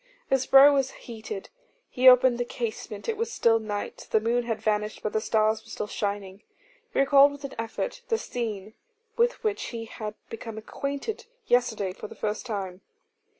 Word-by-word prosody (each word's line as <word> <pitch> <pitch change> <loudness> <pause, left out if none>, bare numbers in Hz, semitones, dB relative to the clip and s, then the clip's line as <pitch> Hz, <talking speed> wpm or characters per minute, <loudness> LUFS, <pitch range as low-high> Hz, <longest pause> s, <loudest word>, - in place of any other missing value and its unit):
His 265 -1 +2
brow 275 +2 +8
was 270 -2 +2
heated; 220 -4 -8 0.4
he 255 +1 +6
opened 250 -1 +5
the - - +2
casement. 225 -3 -5
It 450 -2 -1
was 460 +2 -2
still 230 - +3
night; 205 -2 -5
the 220 - +3
moon 235 +2 0
had 225 -2 -2
vanished, 210 0 -1
but 215 - -2
the 220 - +1
stars 220 0 +1
were 225 - -17
still 215 - -4
shining. 200 -1 -4 0.5
He - - -5
recalled 280 +1 +6
with 285 0 -11
an 275 - -6
effort 230 - -4
the 450 - +2
scene 220 - -5 0.4
with 480 +1 +1
which 430 -2 -1
he 230 -2 -5
had 215 -1 -6
become 225 -1 -7
acquainted 280 - -4 0.2
yesterday 220 - +1
for 210 - -8
the - - -12
first 215 +3 -3
time. 195 -4 -4
225 Hz, 180 wpm, -27 LUFS, 215-270 Hz, 0.5 s, brow